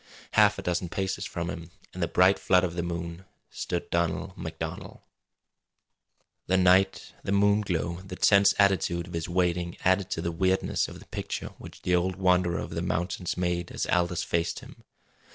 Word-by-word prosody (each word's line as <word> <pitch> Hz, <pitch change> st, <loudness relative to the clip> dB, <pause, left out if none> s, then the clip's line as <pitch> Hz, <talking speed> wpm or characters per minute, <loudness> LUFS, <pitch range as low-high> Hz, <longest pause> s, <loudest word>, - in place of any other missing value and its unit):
Half -, -, +5 dB
a -, -, -6 dB
dozen 90 Hz, 0 st, -1 dB
paces 95 Hz, +1 st, -2 dB
from 85 Hz, 0 st, -4 dB
him, 85 Hz, -2 st, -8 dB, 0.2 s
in 90 Hz, -, -8 dB
the 85 Hz, -, +1 dB
bright 95 Hz, +4 st, +4 dB
flood 90 Hz, 0 st, +3 dB
of 90 Hz, -2 st, -1 dB
the 85 Hz, -, -2 dB
moon, 85 Hz, +1 st, -5 dB, 0.3 s
stood 85 Hz, -, -4 dB
Donald 85 Hz, +2 st, -1 dB
MacDonald. 80 Hz, -3 st, -6 dB, 1.5 s
The 95 Hz, -, +3 dB
night, 95 Hz, +1 st, +3 dB
the -, -, -3 dB
moon 100 Hz, +1 st, +4 dB
glow, 85 Hz, -3 st, -2 dB
the 95 Hz, -1 st, -8 dB
tense 100 Hz, +1 st, +5 dB
attitude 95 Hz, -3 st, +2 dB
of 90 Hz, -, -11 dB
his 85 Hz, 0 st, -3 dB
waiting 90 Hz, -1 st, 0 dB
added 95 Hz, +1 st, +3 dB
to 80 Hz, -, -2 dB
the 85 Hz, -, -1 dB
weirdness 95 Hz, +3 st, +1 dB
of -, -, -10 dB
the -, -, -15 dB
picture -, -, -5 dB
which -, -, -12 dB
the 90 Hz, -, +1 dB
old 90 Hz, +1 st, 0 dB
wanderer 90 Hz, -2 st, +2 dB
of -, -, -5 dB
the -, -, -3 dB
mountains 90 Hz, +2 st, -2 dB
made 90 Hz, -1 st, -1 dB
as -, -, -2 dB
Aldous 90 Hz, -1 st, +1 dB
faced 85 Hz, -1 st, -1 dB
him. -, -, -14 dB
90 Hz, 180 wpm, -27 LUFS, 85-95 Hz, 1.5 s, Half